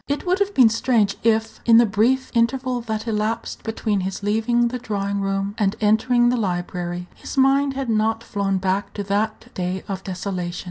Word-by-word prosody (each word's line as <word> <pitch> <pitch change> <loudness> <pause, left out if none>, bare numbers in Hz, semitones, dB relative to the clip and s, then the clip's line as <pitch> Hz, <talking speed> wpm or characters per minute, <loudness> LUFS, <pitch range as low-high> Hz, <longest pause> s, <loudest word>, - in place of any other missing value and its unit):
It 285 +5 -2
would 365 +2 +1
have 405 0 0
been 245 -4 +7
strange 220 -3 +1
if, 225 -1 +1
in 230 -1 +6
the 235 - +7
brief 230 +6 +1
interval 250 +1 +1
that 220 -1 -4
elapsed 220 +1 -2
between 220 -2 -1
his 190 +2 -4
leaving 230 +3 +1
the 250 +1 -4
drawing 200 -3 -2
room 195 0 -1
and 205 -1 +1
entering 240 +3 +3
the 250 - +1
library, 175 -3 -3
his - - -9
mind 270 +1 +3
had 270 -1 -3
not 225 0 +1
flown 200 -3 -1
back 190 +1 -2
to 205 - -3
that 215 +4 -2
day 180 +1 -3
of 195 -1 -5
desolation. 180 -2 -4
220 Hz, 185 wpm, -22 LUFS, 195-240 Hz, -, been